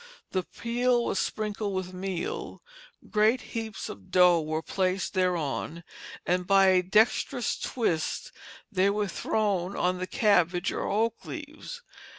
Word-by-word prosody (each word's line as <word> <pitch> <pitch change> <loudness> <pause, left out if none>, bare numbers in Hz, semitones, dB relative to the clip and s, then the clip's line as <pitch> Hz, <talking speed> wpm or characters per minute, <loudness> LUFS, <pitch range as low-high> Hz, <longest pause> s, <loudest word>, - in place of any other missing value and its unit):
The 185 - +1
peel 240 +4 0
was - - 0
sprinkled 210 -2 -2
with 185 -1 -3
meal, 185 -1 -4 0.5
great 215 +4 +4
heaps 225 -3 -4
of 95 -2 -10
dough 180 -2 +5
were 155 +1 -2
placed 185 +1 -1
thereon, 170 -3 -1 0.4
and 180 0 0
by 195 -1 +6
a 185 -1 +5
dexterous 220 +6 +2
twist 170 -10 -2 0.4
they 195 -1 +3
were 205 0 0
thrown 195 -1 -1
on 180 0 0
the 185 - -3
cabbage 180 -5 +2
or - - -2
oak 225 +3 0
leaves. - - -8
190 Hz, 135 wpm, -28 LUFS, 180-215 Hz, 0.5 s, by